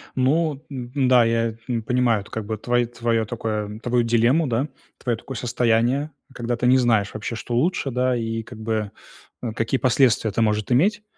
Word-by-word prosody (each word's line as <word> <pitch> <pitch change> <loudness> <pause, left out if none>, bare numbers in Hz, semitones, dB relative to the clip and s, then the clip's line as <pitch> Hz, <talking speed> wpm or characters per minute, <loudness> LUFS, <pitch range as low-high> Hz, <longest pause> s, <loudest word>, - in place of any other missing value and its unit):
Ну, 145 +2 +1
н 130 0 -2
да, 125 -1 +6
я, 115 0 +1
м, 120 -3 -1
понимаю, 120 -3 +1
как 110 0 -6
бы, 110 +1 -3
твои 120 +3 +1
твое 115 -1 -1
такое, 110 -2 -4
твою 120 0 +1
дилемму, 120 +7 +3
да, 125 +4 0 0.3
твое 120 -3 -2
такое 135 +4 -8
состояние, 120 +5 +1 0.2
когда 120 -1 -2
ты 125 - +1
не 130 +1 +6
знаешь, 110 -5 +2
вообще, 110 +2 -4
что 120 +1 -4
лучше, 150 +1 0
да, 125 +1 +1
и 115 -1 -2
как 110 - -11
бы, 110 -2 -2 0.5
э, 120 - -3
какие 115 +4 -1
последствия 125 -3 +3
это 110 - -1
можешь 105 -1 +1
иметь. 200 - +2
120 Hz, 185 wpm, -23 LUFS, 115-130 Hz, 0.5 s, да